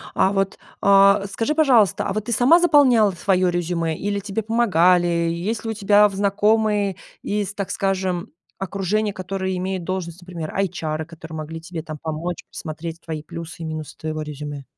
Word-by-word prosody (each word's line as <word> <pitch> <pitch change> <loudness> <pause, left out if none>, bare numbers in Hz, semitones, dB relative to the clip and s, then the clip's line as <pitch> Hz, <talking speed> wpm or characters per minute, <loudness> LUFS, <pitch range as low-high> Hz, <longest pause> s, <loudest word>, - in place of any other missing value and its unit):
А 190 - +3
вот, 195 -1 -1 0.2
э, 200 0 +5
скажи, 230 +9 -1
пожалуйста, 255 - +4
а 195 - -1
вот 215 0 -3
ты 235 - -4
сама 250 +10 +5
заполняла 265 -10 +5
ф 175 - -12
своё 185 -2 +2
резюме 170 -2 -1
или 200 0 -2
тебе 205 +2 -3
помогали? 185 -6 +3 0.2
И - - -1
есть 210 +7 -3
ли 225 - -1
у - - -2
тебя 205 0 +5
в 200 - -7
знакомые 205 0 +2 0.3
из, 205 -1 -2
так 200 -2 -4
скажем, 190 -1 -1 0.3
окружения, 200 +2 -1
которые 190 0 -3
имеют 185 0 -3
должность, 180 -1 -4
например, 170 -3 -7
эйчары, 160 -5 -2
которые 160 -1 -10
могли 155 +1 -6
тебе 165 -1 -7
там 155 -2 -7
помочь, 165 +2 -4
посмотреть 165 +1 -7
твои 160 -2 -5
плюсы 165 +2 -8
и - - -4
минусы 155 -1 -6
твоего 155 0 -4
резюме? 145 -1 -6
190 Hz, 180 wpm, -22 LUFS, 165-205 Hz, 0.3 s, э